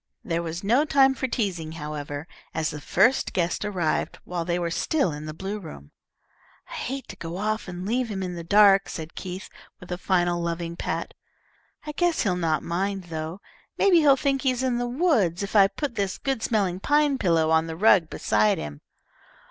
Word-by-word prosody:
There 170 Hz, -2 st, -1 dB
was 170 Hz, +2 st, -5 dB
no 240 Hz, +8 st, +3 dB
time 270 Hz, -3 st, +4 dB
for 260 Hz, 0 st, -2 dB
teasing, 180 Hz, -10 st, -2 dB
however, 150 Hz, -1 st, -6 dB, 0.3 s
as 160 Hz, 0 st, 0 dB
the 150 Hz, -, -7 dB
first 230 Hz, -, +2 dB
guest 175 Hz, +2 st, 0 dB
arrived 185 Hz, -6 st, -1 dB
while 175 Hz, -1 st, -3 dB
they 175 Hz, 0 st, 0 dB
were 170 Hz, -1 st, -2 dB
still 280 Hz, -, +1 dB
in 150 Hz, +1 st, -7 dB
the -, -, -4 dB
blue 195 Hz, +6 st, -5 dB
room. 70 Hz, -, -11 dB, 0.8 s
"I -, -, -10 dB
hate 265 Hz, 0 st, -4 dB
to -, -, -7 dB
go 170 Hz, +1 st, -6 dB
off 215 Hz, +2 st, -2 dB
and 180 Hz, 0 st, -6 dB
leave 240 Hz, +3 st, 0 dB
him 195 Hz, -2 st, -3 dB
in 180 Hz, -1 st, -4 dB
the 170 Hz, -1 st, -6 dB
dark," 195 Hz, +1 st, +5 dB
said 160 Hz, -1 st, -6 dB
Keith, 185 Hz, +1 st, -6 dB, 0.3 s
with 180 Hz, -, -12 dB
a 180 Hz, -, -3 dB
final 175 Hz, -2 st, +1 dB
loving 170 Hz, 0 st, -3 dB
pat. -, -, -3 dB, 0.7 s
"I 300 Hz, -, -4 dB
guess 345 Hz, +2 st, +1 dB
he'll 190 Hz, -5 st, +1 dB
not 165 Hz, -3 st, 0 dB
mind, 195 Hz, +3 st, -2 dB
though. 160 Hz, +4 st, -5 dB, 0.4 s
Maybe 385 Hz, -3 st, +5 dB
he'll 285 Hz, -3 st, +5 dB
think 275 Hz, 0 st, 0 dB
he 270 Hz, -, +2 dB
is 255 Hz, 0 st, -1 dB
in 250 Hz, -2 st, +1 dB
the 245 Hz, -, -1 dB
woods 240 Hz, -, +1 dB
if 200 Hz, -, -5 dB
I 200 Hz, -2 st, +7 dB
put 280 Hz, +6 st, -4 dB
this 200 Hz, -3 st, -2 dB
good 270 Hz, -4 st, -2 dB
smelling 195 Hz, -6 st, 0 dB
pine 290 Hz, +3 st, +2 dB
pillow 165 Hz, -4 st, +2 dB
on 160 Hz, 0 st, +3 dB
the 160 Hz, -, -5 dB
rug 185 Hz, -4 st, +5 dB
beside 105 Hz, 0 st, +2 dB
him." 75 Hz, -1 st, -7 dB
185 Hz, 200 wpm, -25 LUFS, 165-240 Hz, 0.8 s, I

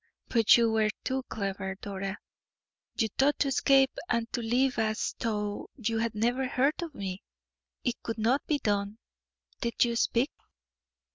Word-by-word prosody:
But 230 Hz, -2 st, +6 dB
you 230 Hz, -1 st, +3 dB
were 220 Hz, -1 st, +2 dB
too 265 Hz, +1 st, -1 dB
clever, 195 Hz, -2 st, -3 dB
Dora; 195 Hz, 0 st, -5 dB, 0.8 s
you 225 Hz, -, +2 dB
thought 285 Hz, +2 st, +4 dB
to 280 Hz, -, +1 dB
escape 270 Hz, 0 st, +4 dB, 0.2 s
and 235 Hz, -1 st, +1 dB
to 240 Hz, -, -1 dB
live 250 Hz, +3 st, +1 dB
as 220 Hz, 0 st, 0 dB
though 210 Hz, -2 st, -2 dB
you 230 Hz, -3 st, -1 dB
had 230 Hz, -1 st, -1 dB
never 245 Hz, +4 st, +1 dB
heard 275 Hz, +5 st, +1 dB
of 330 Hz, -4 st, -6 dB
me. 190 Hz, -1 st, -4 dB, 0.6 s
It 245 Hz, -1 st, -2 dB
could 230 Hz, -, -4 dB
not 235 Hz, +6 st, +2 dB
be 300 Hz, -, +2 dB
done. 205 Hz, -3 st, -1 dB, 0.6 s
Did 235 Hz, 0 st, +2 dB
you 235 Hz, -1 st, -1 dB
speak?" 235 Hz, +4 st, +1 dB
230 Hz, 155 wpm, -29 LUFS, 210-260 Hz, 0.8 s, But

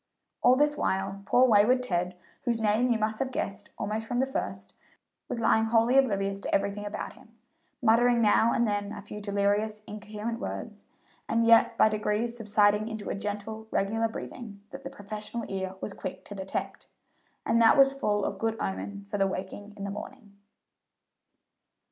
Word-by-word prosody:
All 250 Hz, -, +6 dB
this 295 Hz, +2 st, +3 dB
while 195 Hz, -4 st, -1 dB
poor 250 Hz, +1 st, +5 dB
wayward 240 Hz, +3 st, +4 dB
Ted, 180 Hz, -5 st, -1 dB, 0.3 s
whose 235 Hz, -2 st, +1 dB
name 220 Hz, +3 st, +2 dB
you 235 Hz, -, +3 dB
must 215 Hz, 0 st, -1 dB
have 270 Hz, -, -1 dB
guessed 200 Hz, -5 st, -4 dB
almost 220 Hz, +2 st, -3 dB
from 245 Hz, -, -1 dB
the 265 Hz, -, +3 dB
first, 265 Hz, -, -5 dB, 0.6 s
was 235 Hz, -, -3 dB
lying 220 Hz, 0 st, +3 dB
wholly 230 Hz, +2 st, +3 dB
oblivious 200 Hz, -7 st, +2 dB
to -, -, -1 dB
everything 200 Hz, +1 st, -1 dB
about 210 Hz, +1 st, -5 dB
him, 230 Hz, -1 st, -20 dB, 0.5 s
muttering 240 Hz, +1 st, +4 dB
now 225 Hz, +1 st, +4 dB
and 235 Hz, -, +2 dB
then 205 Hz, -1 st, -1 dB
a 205 Hz, -2 st, -8 dB
few 210 Hz, +1 st, -8 dB
delirious, 205 Hz, +1 st, 0 dB
incoherent 215 Hz, +2 st, -6 dB
words, -, -, -6 dB, 0.4 s
and 230 Hz, +1 st, +2 dB
yet 230 Hz, 0 st, +5 dB
by -, -, +6 dB
degrees 215 Hz, +2 st, -1 dB
subsiding 210 Hz, -1 st, +2 dB
into 220 Hz, -2 st, -5 dB
a -, -, 0 dB
gentle, 210 Hz, +2 st, -5 dB
regular 225 Hz, +3 st, 0 dB
breathing 220 Hz, -2 st, -8 dB
that 270 Hz, 0 st, -9 dB
the 270 Hz, -, -5 dB
professional 215 Hz, -1 st, -6 dB
ear 190 Hz, -1 st, -3 dB
was 205 Hz, -, -4 dB
quick -, -, -7 dB
to -, -, -8 dB
detect, 190 Hz, -1 st, -5 dB, 0.6 s
and 230 Hz, -, +3 dB
that 225 Hz, -, +6 dB
was 270 Hz, 0 st, +6 dB
full 205 Hz, -7 st, 0 dB
of 195 Hz, -, -3 dB
good 225 Hz, 0 st, -1 dB
omen 200 Hz, +1 st, -4 dB
for 205 Hz, 0 st, -3 dB
the 195 Hz, -, +3 dB
waking 195 Hz, +2 st, -6 dB
in 200 Hz, -, -6 dB
the 200 Hz, -, -3 dB
morning. 210 Hz, 0 st, -9 dB
215 Hz, 175 wpm, -28 LUFS, 205-230 Hz, 0.6 s, All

